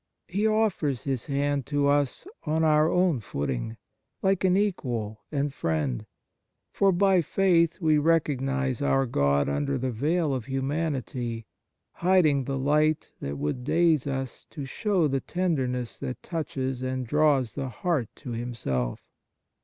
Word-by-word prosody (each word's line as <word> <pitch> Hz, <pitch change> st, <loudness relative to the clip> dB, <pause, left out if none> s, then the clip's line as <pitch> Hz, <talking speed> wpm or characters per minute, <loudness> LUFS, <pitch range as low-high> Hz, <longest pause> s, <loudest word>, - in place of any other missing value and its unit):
He 205 Hz, +4 st, +1 dB
offers 205 Hz, -, +1 dB
His 135 Hz, -4 st, -2 dB
hand 140 Hz, -1 st, 0 dB
to 145 Hz, 0 st, +1 dB
us 145 Hz, -, +1 dB, 0.2 s
on 160 Hz, +1 st, 0 dB
our 155 Hz, 0 st, +4 dB
own 180 Hz, -6 st, +2 dB
footing, 75 Hz, -, -3 dB, 0.5 s
like 195 Hz, -1 st, +2 dB
an 185 Hz, 0 st, +4 dB
equal 120 Hz, -, -1 dB
and 145 Hz, -1 st, -1 dB
friend; 75 Hz, -, -2 dB, 0.7 s
for 195 Hz, -1 st, +4 dB
by 190 Hz, 0 st, +4 dB
faith 170 Hz, 0 st, +2 dB
we 155 Hz, -3 st, +3 dB
recognize 140 Hz, -5 st, +1 dB
our 135 Hz, -1 st, +2 dB
God 70 Hz, -, +2 dB
under 140 Hz, -1 st, 0 dB
the 130 Hz, 0 st, -2 dB
veil 150 Hz, +6 st, 0 dB
of 125 Hz, -4 st, -3 dB
humanity, 135 Hz, -4 st, -2 dB, 0.5 s
hiding 165 Hz, -7 st, +3 dB
the 135 Hz, +1 st, -2 dB
light 150 Hz, +3 st, +1 dB
that 70 Hz, +1 st, -4 dB
would 75 Hz, -, -2 dB
daze 160 Hz, -1 st, +2 dB
us 135 Hz, -2 st, -4 dB
to 145 Hz, -, -6 dB
show 185 Hz, -, +1 dB
the 135 Hz, -1 st, 0 dB
tenderness 130 Hz, -9 st, -2 dB
that 125 Hz, -, -5 dB
touches 135 Hz, -6 st, -3 dB
and 130 Hz, 0 st, -2 dB
draws 140 Hz, -3 st, +2 dB
the 135 Hz, -1 st, -3 dB
heart 135 Hz, -1 st, -1 dB
to 125 Hz, -, -8 dB
Him 120 Hz, +1 st, -4 dB
self. 65 Hz, -, -2 dB
140 Hz, 145 wpm, -27 LUFS, 125-165 Hz, 0.7 s, our